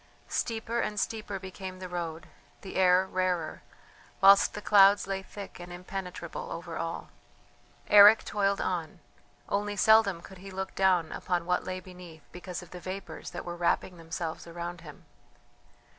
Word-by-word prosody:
Steeper 230 0 -2
and 210 -2 -1
steeper 215 -1 -3
became 190 0 -8
the 185 0 -7
road, 170 -2 -5 0.4
the 195 - -9
air 185 0 +5
rarer, 180 -4 -2 0.6
whilst 195 +1 +6
the - - -4
clouds 200 0 +6
lay 195 0 -3
thick 200 0 -10
and 175 0 -9
impenetrable 180 -1 -6
over 170 -1 -6
all. 165 0 -4 0.8
Eric 210 +1 +8
toiled 200 -1 0
on; 175 -1 -3 0.5
only 205 +1 -1
seldom 210 -3 +5
could 190 +1 -13
he 195 +1 -10
look 190 0 -5
down 185 -4 +2
upon 175 -2 -2
what 180 0 0
lay 185 0 -4
beneath 180 -4 -13
because 180 0 -7
of 175 - -16
the 180 - -8
vapours 185 +3 -7
that 175 - -7
were 175 0 -5
wrapping 175 +1 0
themselves 165 0 -5
around 170 +1 -6
him. 150 -3 -13
185 Hz, 155 wpm, -29 LUFS, 175-195 Hz, 0.8 s, Eric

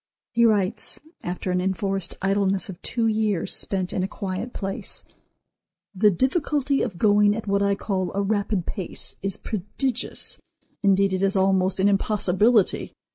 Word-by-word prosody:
He 235 0 +3
writes, 205 -4 0 0.2
after 180 +1 -4
an 180 0 0
enforced 190 0 -2
idleness 195 0 +1
of 180 - -9
two 230 -1 -1
years, 215 -4 +1
spent 190 -2 +2
in - - -1
a 185 - -1
quiet 195 +4 -5
place; 195 -3 -2 0.9
"The 210 +2 +4
difficulty 275 - 0
of 200 -8 -3
going 205 +1 +4
at 225 - -5
what 200 -1 +1
I 200 0 +2
call 190 -3 -2
a 200 - +1
rapid 200 -2 -1
pace 190 -5 0
is 195 0 -2
prodigious; 230 +5 -1 0.4
indeed, 195 -1 +3
it 185 - -1
is 195 0 +2
almost 190 0 +2
an 195 - +3
impossibility. 205 +1 +2
195 Hz, 150 wpm, -24 LUFS, 190-215 Hz, 0.9 s, The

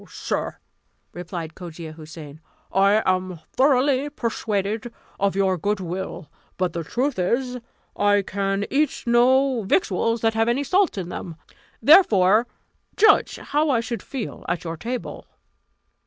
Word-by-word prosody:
"Sir," - - -3 0.6
replied 170 -2 -6
Cogia 165 -2 -9
Houssain, 155 -1 -11 0.3
"I 200 +3 +3
am 185 -2 0 0.2
thoroughly 270 +1 +3
persuaded 220 -2 -2 0.3
of 200 0 +1
your 190 -2 +1
good 205 +4 -1
will; 180 -3 -5 0.3
but 180 -2 -1
the 170 - -3
truth 250 - -2
is, 250 +7 0 0.4
I 205 0 +3
can 195 +1 -1
eat 290 +1 0
no 255 +1 +3
victuals 195 +3 0
that 225 0 +2
have 225 +1 +1
any 255 +4 +1
salt 365 - +2
in 180 -2 -4
them; 170 -2 -6 0.5
therefore 220 - +6 0.5
judge 425 0 +5
how 300 +1 0
I 255 -4 +3
should 230 -2 -4
feel 260 -6 -6
at 175 0 -2
your 165 -1 -4
table." 240 +8 -6
205 Hz, 135 wpm, -23 LUFS, 185-250 Hz, 0.6 s, therefore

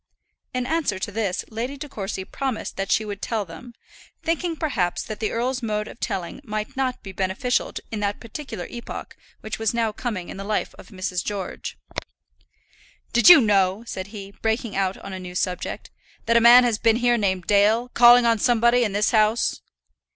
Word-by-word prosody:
In 250 0 -2
answer 285 - 0
to 190 - -4
this 205 -3 -2
Lady 240 +6 -4
De 295 +2 -7
Courcy 195 -6 -5
promised 265 -1 -4
that 195 0 -3
she 220 - +2
would 205 -1 -6
tell 220 -3 -2
them, 210 +9 -11 0.5
thinking 335 0 -1
perhaps 245 - -1
that 215 - -7
the 215 - -1
earl's 250 +3 -1
mode 210 -2 -2
of - - -11
telling 195 0 -4
might 215 -3 -4
not 260 -1 -2
be 195 - -7
beneficial 190 +7 -1 0.2
in 220 - -3
that 205 0 -1
particular 230 - -7
epoch 235 -1 -7 0.3
which 215 0 -5
was 225 +1 0
now 230 -2 +1
coming 210 -5 -4
in - - -7
the 195 - -5
life 210 +1 -2
of - - -12
Mrs. 185 -3 -3
George. 200 - -5 1.4
"Did 240 +7 +7
you 335 -5 +11
know," 200 -1 +2
said 190 -4 -5
he, 200 -2 -9
breaking 225 -1 -1
out 195 -1 0
on 195 - -8
a 190 - -5
new 180 -1 -8
subject, 180 0 -3 0.3
"that 230 - +2
a 235 - +6
man 240 +2 +9
had 235 -3 0
been 225 -1 +4
here 240 0 +3
named 190 -5 0
Dale, 215 +4 +3
calling 240 0 +7
on 230 -1 +3
somebody 240 +1 +3
in 210 -4 -1
this 210 +1 +2
house?" 220 +1 +2
220 Hz, 190 wpm, -23 LUFS, 195-240 Hz, 1.4 s, you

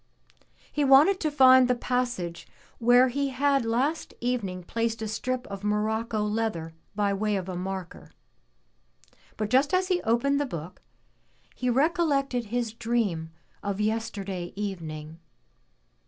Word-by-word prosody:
He 295 - 0
wanted 285 +8 +6
to 310 - 0
find 260 -3 +7
the 250 - +2
passage 240 -9 -2 0.3
where 245 +2 +5
he 280 +2 -1
had 275 0 +2
last 260 +8 -1
evening 205 -7 -2
placed 230 +4 -2
a - - -2
strip 250 +4 -3
of 200 0 -8
morocco 215 +1 0
leather 210 -7 -2 0.2
by 205 -1 +1
way 210 +1 0
of 190 -2 -3
a 185 - -4
marker. 185 0 -6 1.3
But 215 0 -2
just 275 +6 +3
as 370 +1 +1
he 360 -1 +1
opened 280 +5 +1
the 290 - -1
book, 170 -3 -7 0.7
he 250 - -2
recollected 275 -3 +1
his 235 0 -2
dream 225 -9 -1 0.3
of 200 -1 -3
yesterday 210 -5 -3
evening. 165 -6 -5
230 Hz, 135 wpm, -27 LUFS, 200-260 Hz, 1.3 s, find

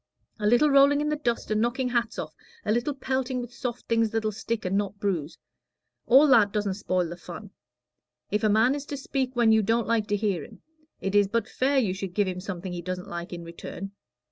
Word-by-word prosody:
A 210 - 0
little 240 +7 +4
rolling 280 +1 +6
in 300 0 0
the 300 - +1
dust 240 -7 -2
and 215 0 +2
knocking 250 +2 0
hats 235 -2 -1
off, - - -5 0.3
a - - +1
little 240 +6 0
pelting 260 -1 -2
with 245 0 -7
soft 245 -1 -5
things 230 -1 +2
that'll 220 0 -1
stick 220 +1 -4
and 185 +1 0
not 200 0 -1
bruise 175 -7 -2 0.7
all 270 +5 +7
that 215 -6 +6
doesn't 205 -2 -1
spoil 185 -2 -1
the 170 - -6
fun. 170 - -10 0.8
If 210 +2 0
a 215 - +4
man 220 +5 +4
is 285 0 -5
to 285 - -4
speak 265 -1 -2
when 235 -2 +4
you 220 0 +5
don't 225 +3 +1
like 225 -2 +1
to 205 - +1
hear 200 -6 -1
him, - - -14 0.4
it 195 - -2
is 205 -1 +5
but 230 +3 -1
fair 275 +2 +1
you 215 -8 +2
should 190 -1 -6
give 205 -2 +2
him 180 -1 -3
something 185 -1 -5
he 175 - -4
doesn't 185 +2 -5
like 170 -1 -6
in 170 -1 -6
return. 170 +3 -8
220 Hz, 225 wpm, -26 LUFS, 195-245 Hz, 0.8 s, all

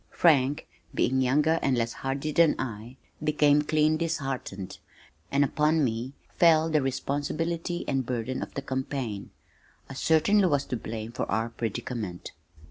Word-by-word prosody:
Frank, 145 -4 +3 0.3
being 130 +1 +2
younger 150 +5 +3
and 130 -2 +1
less 115 0 -1
hardy 135 +3 -3
than 165 0 +4
I, 115 0 -6 0.3
became 150 -1 +4
clean 155 +1 +2
disheartened, 135 - -4 0.5
and 140 +1 +3
upon 150 +3 +2
me 120 +2 -2 0.2
fell 160 -1 +4
the 155 -1 +3
responsibility 155 +6 -2
and 135 -1 0
burden 125 +1 -3
of - - -7
the 140 - -3
campaign. 130 -6 -3 0.6
I - - -5
certainly 165 +8 +3
was 145 -4 +1
to - - -3
blame 110 -1 -5
for - - -4
our 110 +3 0
predicament. 110 -4 -5
135 Hz, 140 wpm, -27 LUFS, 120-155 Hz, 0.6 s, than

